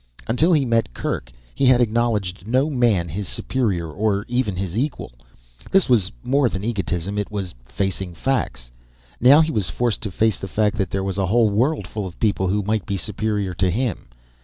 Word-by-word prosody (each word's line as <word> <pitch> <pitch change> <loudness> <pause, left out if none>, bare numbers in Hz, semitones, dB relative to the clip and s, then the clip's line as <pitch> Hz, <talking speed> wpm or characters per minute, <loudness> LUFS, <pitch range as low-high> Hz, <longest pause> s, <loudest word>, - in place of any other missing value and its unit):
Until 150 +10 +2
he 150 -5 +3
met 115 - 0
Kerk - - -3 0.2
he 135 - +2
had 125 -1 +6
acknowledged 110 -5 0
no 130 +6 +2
man 115 -10 +2
his 95 +4 -4
superior, 105 -10 -1
or 100 +5 -1
even 120 -5 0
his 95 -1 -4
equal. 130 - -2 0.6
This 195 -2 +4
was 110 -7 +3
more 135 -1 +2
than 95 -1 -5
egotism. 100 -3 -2
It 105 - -3
was 100 -4 -4
facing 95 +3 -3
facts. 65 - -2 0.5
Now 135 +6 +7
he 160 0 +1
was 105 - 0
forced 120 -3 -1
to 110 - -3
face 110 +3 +1
the 95 - -5
fact 105 +2 +1
that 95 -3 0
there 95 0 -2
was 95 0 -2
a 95 - +1
whole 110 +2 +3
world 120 - +1
of 95 -5 -5
people 100 -3 +1
who 100 +3 0
might 105 0 -1
be 100 -2 -1
superior 105 0 -2
to 90 +2 +1
him. 110 - -2
105 Hz, 190 wpm, -22 LUFS, 95-120 Hz, 0.6 s, Now